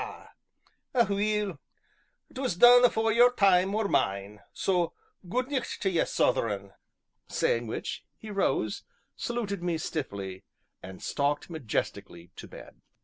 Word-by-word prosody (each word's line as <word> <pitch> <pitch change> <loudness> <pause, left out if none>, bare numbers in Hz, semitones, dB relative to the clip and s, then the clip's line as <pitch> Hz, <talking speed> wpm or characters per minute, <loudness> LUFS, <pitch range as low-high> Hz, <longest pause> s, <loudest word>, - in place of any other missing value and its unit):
Aweel! 210 - +1 0.7
'twas 260 -8 -2
done 245 +6 +8
afore 225 -2 +3
your 240 +2 +6
time 195 -3 +3
or 215 -1 +1
mine 100 - -1
so 180 -3 0 0.4
gude 250 +6 -1
nict 265 -4 -2
tae 190 - 0
ye, 170 - +2
Southeron!" 100 -5 0 0.6
Saying 115 0 0
which, 110 - -5
he 220 - -9
rose, 135 - 0 0.3
saluted 215 -6 -3
me 175 -2 -1
stiffly, 100 - -5 0.4
and 95 0 -10
stalked 145 +3 -1
majestically 100 - -4
to - - -9
bed. - - -13
180 Hz, 120 wpm, -28 LUFS, -, 0.7 s, done